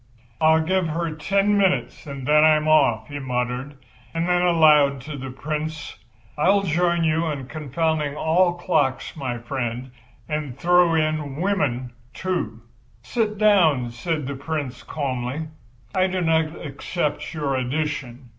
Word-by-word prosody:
"I'll 160 0 +5
give 185 +1 +1
her 165 +1 -2
the - - -7
ten 200 +6 +2
minutes 190 -5 0
and 140 -2 -6
then 150 +2 +5
I'm 155 0 +4
off," 120 -8 +3
he 145 0 -6
muttered, 125 +1 -3 0.4
and 165 +1 0
then 180 0 +2
aloud 155 -5 +5
to 150 +3 -7
the 135 -1 -6
Prince: 150 +3 -5 0.4
"I'll 195 +6 +4
join 170 0 +1
you 160 +1 +1
in 140 -4 -3
confounding 150 +1 -2
all 175 +3 +2
clocks, 175 -7 0
my 130 -5 -3
friend, 120 0 -4 0.4
and 150 -5 -4
throw 175 +1 +4
in 155 -3 0
women, 145 -9 -1 0.2
too." 115 - -3 0.4
"Sit 215 -3 -1
down," 165 - +4
said 150 +5 -3
the 140 - -3
Prince 140 -3 -4
calmly. 140 +1 -3 0.4
"I 185 0 +3
do 185 0 -2
not 160 -1 +1
accept 145 +2 -3
your 145 -3 -1
addition. 130 -2 -3
155 Hz, 145 wpm, -23 LUFS, 135-170 Hz, 0.4 s, I'll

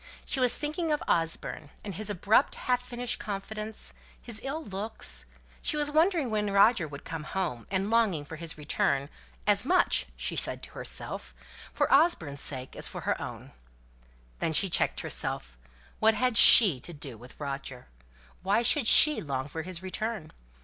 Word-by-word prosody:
She 270 - -2
was 250 -2 +3
thinking 310 +2 -3
of 300 - -1
Osborne, 165 -2 -2
and 200 - -6
his 210 +4 -5
abrupt, 205 +6 +2
half 250 -1 -1
finished 245 -1 -4
confidence, 215 +2 -6
and - - -27 0.3
his 225 -2 -8
ill 295 +4 -4
looks; 205 -1 -5 0.3
she 305 - -1
was 295 0 0
wondering 320 - +1
when 210 -1 -1
Roger 200 -2 +4
would 145 -1 -11
come 165 -2 -6
home, 155 -8 -4
and 195 +2 -2
longing 205 -10 +1
for 155 +2 -9
his 165 -1 -4
return, 140 -2 -1 0.4
as - - +2
much - - +2
(she - - -2
said - - +1
to - - -9
herself) - - -6 0.4
for - - 0
Osborne's 225 - +2
sake 130 -2 -3
as - - +2
for - - -7
her - - -2
own. - - -7
And - - -17 0.9
then 160 - -2
she 190 +3 +3
checked - - +1
herself. - - -3 0.4
What 220 0 +4
had 250 +2 0
she 200 - +9
to 170 - -6
do 145 -5 -8
with 120 +3 -15
Roger? 135 -3 -6 0.6
Why 200 +5 +1
should 260 0 +3
she 305 +5 +8
long 135 -2 -4
for 160 +2 -6
his 180 +1 -4
return? 190 -3 -5
200 Hz, 175 wpm, -28 LUFS, 155-240 Hz, 0.9 s, she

